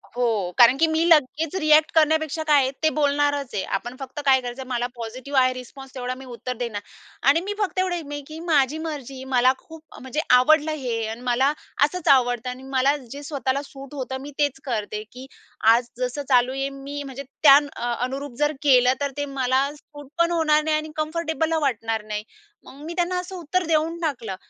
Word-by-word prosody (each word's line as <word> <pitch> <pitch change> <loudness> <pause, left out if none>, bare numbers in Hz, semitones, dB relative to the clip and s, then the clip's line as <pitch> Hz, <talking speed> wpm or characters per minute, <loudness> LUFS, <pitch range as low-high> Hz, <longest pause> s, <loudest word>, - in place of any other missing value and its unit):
हो, 220 -7 0
कारण 245 +2 +7
की 325 +1 +4
मी 320 +1 +1
लगेच 310 +1 +3
रिएक्ट 305 0 +4
करण्यापेक्षा 315 0 +2
काय 295 -2 +4
आहे, 260 0 0
ते 315 - +5
बोलणारच 285 -2 0
आहे. 195 - -1
आपण 240 +1 -4
फक्त 265 +1 -7
काय 265 -1 +5
करायचं, 250 +1 -7
मला 245 -1 -1
पॉझिटिव्ह 255 +4 -2
आहे 255 0 +3
रिस्पॉन्स, 260 +1 -11
तेवढा 250 0 -3
मी 265 - -11
उत्तर 250 0 -5
देणार. 230 -4 -4 0.5
आणि 330 +4 +4
मी 410 +2 -4
फक्त 385 -2 -1
एवढं 370 -1 +1
आहे 335 - -4
मी, 290 0 -6
की 315 +1 -8
माझी 310 -4 +2
मर्जी 275 -4 -6
मला 255 +1 +5
खूप, 320 -1 -14 0.2
म्हणजे 265 +4 -2 0.2
आवडलं 310 +4 +4
हे 245 -7 -2
आणि 225 +2 -6
मला 255 +3 +2 0.3
असंच 330 +4 -1
आवडतं 245 -2 +2
आणि 255 +1 -8
मला 270 +2 +3
जे 280 +2 -10
स्वतःला 280 -2 -2
सूट 275 +1 -12
होतं, 265 -1 -4
मी 290 +1 -8
तेच 285 -2 +1
करते 215 -3 -3
की 255 +2 -10 0.5
आज 240 +1 +1
जसं 250 +3 -3
चालू 250 0 +4
आहे 270 +1 -2
मी, 275 +1 -7
म्हणजे 275 0 -7 0.2
त्या 280 -1 +10 0.2
अ, 240 0 -2
अनुरूप 270 0 -6
जर 295 0 +2
केलं, 255 -2 +5
तर 280 - -1
ते 290 - -1
मला 270 0 0
सूट 290 -1 -14
पण 340 0 +3
होणार 305 -2 +3
नाही 310 0 +1
आणि 310 0 -5
कम्फर्टेबल 320 +1 -1
अ 320 - +2
वाटणार 225 -5 -1
नाही. 210 0 -4 0.4
मग 275 +2 -14
मी 340 - -5
त्यांना 355 +1 0
असं 365 +1 -7
उत्तर 355 +1 -1
देऊन 325 +1 0
टाकलं. 235 - -3
275 Hz, 200 wpm, -23 LUFS, 250-310 Hz, 0.5 s, त्या